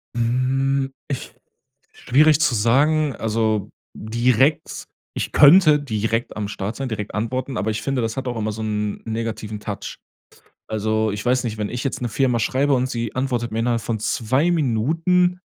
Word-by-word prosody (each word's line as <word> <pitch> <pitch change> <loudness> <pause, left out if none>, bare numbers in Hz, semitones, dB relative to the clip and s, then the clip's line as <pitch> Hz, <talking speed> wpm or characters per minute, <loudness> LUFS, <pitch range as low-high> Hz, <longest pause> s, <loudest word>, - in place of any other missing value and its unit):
Hm, 135 +3 0 0.2
ich 140 -4 -5 0.6
schwierig 150 +4 +3
zu 135 -6 +2
sagen, 140 +6 +2
also 110 -2 -1 0.3
direkt 120 +6 +1 0.3
ich - - -3
könnte 155 0 +7
direkt 115 -3 -2
am 105 -1 -3
Start 100 +1 -5
sein, 135 -1 -4
direkt 105 -2 -5
antworten, 130 +4 -3
aber 110 - -1
ich 110 0 -3
finde, 135 -2 -1
das 115 +1 -3
hat 135 -1 -3
auch 120 - -2
immer 110 -1 -2
so 110 +1 -5
'n 105 -1 -2
negativen 110 -1 -4
Touch. 105 -1 -6 0.7
Also, 110 0 0
ich 105 +2 -5
weiß 125 +1 +2
nicht, 110 -2 -3
wenn 105 -1 -2
ich 125 0 -4
jetzt 135 - -2
'ner 120 - -3
Firma 125 +1 +1
schreibe 135 +5 +1
und 130 0 0
sie 115 -2 -4
antwortet 125 -3 -1
mir 110 - -3
innerhalb 115 0 0
von 110 +1 -2
2 130 +9 0
Minuten: 165 - +1
120 Hz, 170 wpm, -21 LUFS, 110-135 Hz, 0.7 s, könnte